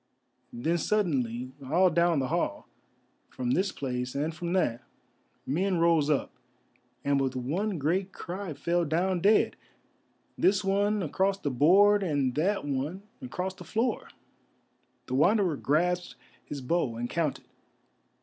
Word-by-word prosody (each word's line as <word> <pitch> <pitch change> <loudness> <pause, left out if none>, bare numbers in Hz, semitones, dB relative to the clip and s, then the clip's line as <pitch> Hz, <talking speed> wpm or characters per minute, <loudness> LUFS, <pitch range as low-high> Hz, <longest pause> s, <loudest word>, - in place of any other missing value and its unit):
Then 160 +9 -1
suddenly 130 - 0
all 175 +7 +3
down 170 0 +3
the 130 -2 -1
hall, - - -2 0.6
from 125 -1 -3
this 190 +6 +1
place 125 -4 -4
and 150 +3 -1
from 170 +1 -5
that, 120 -11 +1 0.6
men 180 +6 0
rose 165 -3 +3
up 150 - 0 0.7
and 140 -1 +2
with 130 -1 -1
one 175 - -2
great 180 +6 0
cry 185 -3 -6
fell 175 +3 0
down 175 +4 0
dead, 205 +5 +3 0.8
this 195 +1 +3
one 200 +1 +1
across 190 +5 0
the 145 -7 -3
board, 195 +10 +5
and 145 -8 0
that 185 +5 0
one 145 +7 -3 0.2
across 190 -7 -4
the - - -12
floor. 230 +1 -1 1.0
The - - -6
Wanderer 180 +4 +3
grasped 175 +6 0 0.3
his 145 -2 -7
bow 130 -3 0
and 120 +1 -3
counted. 155 0 -2
170 Hz, 135 wpm, -28 LUFS, 140-190 Hz, 1.0 s, board